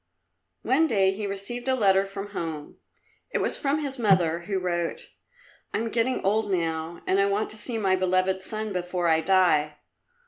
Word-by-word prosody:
One 280 +7 +3
day 195 -7 +3
he 205 +1 -4
received 200 +6 -5
a 260 - +3
letter 195 -4 +3
from 195 +1 -7
home. 160 -6 -5 0.5
It - - -1
was - - 0
from 285 +2 0
his 270 -2 -3
mother, 180 -7 +3
who 200 -2 -1
wrote, 180 - -3 0.6
"I - - +3
am 225 +1 -2
getting 240 +2 0
old 210 +2 +1
now, 165 -1 -2
and 190 - +2
I 200 - +4
want 200 +2 -1
to - - -10
see 225 +2 -3
my 195 -3 +2
beloved 185 0 +1
son 215 +1 -4
before 180 -1 -1
I 160 -1 +3
die. 160 -4 +3
195 Hz, 180 wpm, -26 LUFS, 180-220 Hz, 0.6 s, I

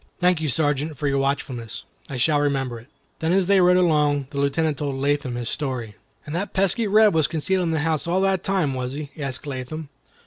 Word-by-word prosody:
"Thank 180 -2 +2
you, 155 - -1
Sergeant, 145 +1 0
for 145 - -1
your 140 0 +1
watchfulness. 125 -5 -3 0.3
I 135 - -4
shall 145 +4 +2
remember 135 -4 -1
it." 115 - -17 0.3
Then 160 +1 0
as 190 0 +3
they 195 0 +4
rode 180 0 +5
along, 150 -5 +2
the 140 - -4
Lieutenant 140 +1 0
told 140 -2 -2
Latham 140 -2 -1
his 120 -1 -4
story. 125 -7 -3 0.3
"And 150 - -6
that 195 +4 -3
pesky 195 +4 +2
Reb 215 +1 +5
was 160 -3 +3
concealed 175 +4 0
in - - 0
the 160 -2 0
house 160 0 -1
all 180 +2 +1
the 195 0 +3
time, 185 -7 0
was 130 0 -3
he?" 145 0 -6
asked 135 0 -4
Latham. 140 +2 -6
150 Hz, 215 wpm, -23 LUFS, 135-170 Hz, 0.3 s, rode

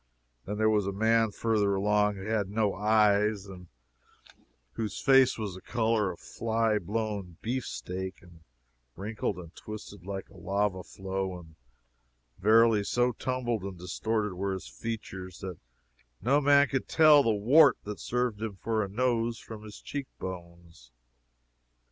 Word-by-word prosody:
Then 105 +1 -3
there 110 0 +3
was 105 -2 +1
a - - 0
man 110 +2 +3
further 105 -2 +1
along 105 +1 +2
who 95 0 -8
had 110 -3 0
no 105 -1 +1
eyes, 105 0 +3
and 90 -2 -11 1.0
whose 105 - -4
face 135 -2 +5
was 105 -4 -4
the 95 - -10
color 110 -3 +1
of 85 - -10
a - - -19
fly 115 -1 0
blown 100 -3 -3
beefsteak, 95 -6 -4
and 85 -2 -17 0.6
wrinkled 105 -1 -3
and 85 -1 -10
twisted 105 -3 -9
like 95 0 -5
a - - -17
lava 100 -1 -1
flow 95 0 -4
and 80 -2 -15 0.8
verily 110 +1 +5
so 120 +4 +1
tumbled 120 -2 -2
and 95 -1 -6
distorted 105 +4 -2
were 95 +2 -2
his 95 - -6
features 95 -6 -6
that 90 -4 -6 0.6
no 140 +5 +3
man 140 0 +5
could 135 0 -2
tell 155 -2 +7
the 115 - +1
wart 125 +9 +5
that 105 -1 -6
served 125 -3 -1
him 110 -3 -3
for 110 +2 -1
a 100 - -5
nose 115 +1 0
from 110 -2 -10
his 105 -1 -10
cheek 140 -2 -5
bones. 85 -7 -9
105 Hz, 155 wpm, -29 LUFS, 95-115 Hz, 1.0 s, tell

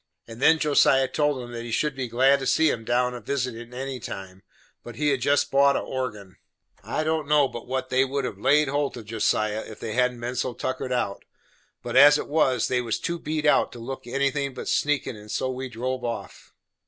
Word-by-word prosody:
And 115 +2 -11
then 160 +3 +6
Josiah 140 -3 +4
told 145 -3 0
'em 120 - -9
that 120 -1 -5
he 120 - -7
should 145 +5 0
be 130 -2 -3
glad 135 +4 +3
to 135 - -3
see 160 -1 +3
'em 115 - -4
down 125 +2 +1
a 120 - -7
visitin' 125 -4 -3
any 130 +1 -5
time, 95 -3 -8 0.4
but 120 - -9
he 150 +2 +1
had 135 -3 0
jest 145 +2 +2
bought 140 0 +4
a - - +1
organ. 105 -8 -5 0.5
I 120 +9 -2
don't 155 -1 -1
know 150 -2 +4
but 120 -2 -9
what 130 0 -3
they 130 +1 +3
would 135 0 -2
have 100 - -5
laid 145 +5 +3
holt 145 -1 -1
of 115 - -9
Josiah, 110 -1 0
if 110 - -11
they 110 - -5
hadn't 125 0 +1
been 120 +2 -4
so 125 -1 -2
tuckered 130 0 -3
out; 120 -6 -2 0.6
but - - -5
as 145 +2 +8
it - - -5
was, 135 -6 +2
they 125 -1 +1
was 115 -2 -2
too 170 0 -3
beat 155 0 -3
out 150 - +3
to 120 - -10
look 125 +1 -7
anything 140 +1 -1
but - - -7
sneakin'; 145 -5 0
and 105 0 -13
so 130 +4 -1
we 130 0 -5
drove 125 +2 -4
off. 115 -2 -6
130 Hz, 225 wpm, -25 LUFS, 120-140 Hz, 0.6 s, as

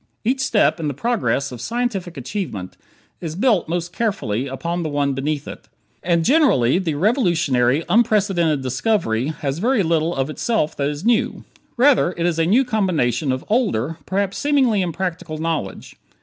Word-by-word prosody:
Each 255 +4 0
step 225 -8 +2
in 155 - -2
the 145 - -3
progress 145 - -1
of 120 -2 -8
scientific 210 - -3
achievement 130 - -5 0.4
is 160 -2 -5
built 205 -5 +2
most 175 +1 -3
carefully 140 - -1
upon 170 +6 -3
the 160 - -2
one 145 -1 0
beneath 145 +2 -3
it. - - -9 0.3
And 170 -2 +1
generally 245 - +4
the 165 -6 -2
"revolutionary, 160 - +2
unprecedented 195 - +2
discovery" 130 - 0
has 150 -1 -3
very 235 +1 +2
little 165 0 +1
of 135 +2 -1
itself 190 -2 -1
that 140 0 0
is 150 +6 -6
new; 235 -1 +1 0.3
rather 255 -8 +4
it 170 - -1
is 170 -2 0
a 165 - +2
new 245 +9 +4
combination 165 - 0
of 130 0 -3
older, 175 - 0
perhaps 195 +1 -1
seemingly 265 -8 +2
impractical 180 -2 -3
knowledge. 155 - -4
170 Hz, 160 wpm, -21 LUFS, 145-215 Hz, 0.4 s, generally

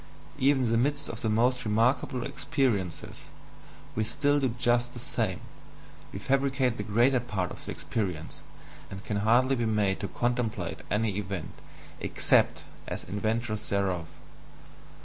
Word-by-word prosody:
Even 135 0 +4
in 115 - +1
the 115 - +3
midst 145 +3 0
of 115 - -6
the 110 - 0
most 125 +3 +2
remarkable 125 +4 +1
experiences, 130 - -2 0.7
we 110 - 0
still 145 +5 +2
do 135 -2 +1
just 120 0 +2
the 120 - -8
same; - - -1 0.7
we - - -6
fabricate 135 +1 +1
the - - -2
greater 120 +6 +3
part 105 -7 -2
of - - -9
the - - -7
experience, 90 -8 -4 0.5
and 95 +1 -8
can 105 - -1
hardly 120 +6 +4
be 120 -2 0
made 105 -3 +1
to 100 - -3
contemplate 120 -1 -1
any 105 -1 0
event, 100 -5 -4 0.5
EXCEPT - - +2 0.2
as - - -4
"inventors" 110 +3 -2
thereof. 95 -4 0
115 Hz, 145 wpm, -29 LUFS, 105-130 Hz, 0.7 s, Even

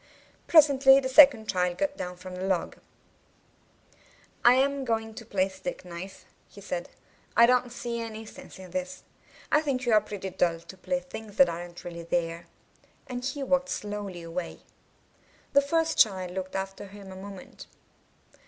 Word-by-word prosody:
Presently 275 -4 +7
the 265 - -2
second 260 -5 +7
child 180 -2 0
got 290 -1 -1
down 180 -6 -6
from 185 +1 -9
the 180 - -6
log. 190 -2 -1 1.7
'1 240 +1 +7
am 275 +1 +1
going 225 -2 -2
to 225 - -9
play 195 -4 0
stick 190 +3 -7
knife," 180 +2 -9 0.2
he - - -14
said. - - -5 0.5
'1 235 - +7
don't 250 0 +2
see 235 -1 -4
any 225 -1 -6
sense - - -12
in 185 -2 -11
this. 185 0 -4 0.5
I 300 - +5
think 265 -4 -2
you 240 - +2
are 215 - +6
pretty 200 -2 -6
dull 175 -2 +1
to 170 - -12
play 270 +8 -2
things 220 -6 -10
that 275 - +6
aren't 175 +1 -7
really 170 -1 -7
there." 170 0 -2 0.6
And 250 -3 -6
he 275 +2 -3
walked 270 0 +1
slowly 205 -4 -5
away. 165 +1 -6 0.9
The 280 - +6
first 325 +3 0
child 185 -4 +3
looked 185 0 -5
after 195 +1 -4
him 195 -1 -12
a - - -9
moment. 195 0 -10
210 Hz, 165 wpm, -27 LUFS, 185-265 Hz, 1.7 s, Presently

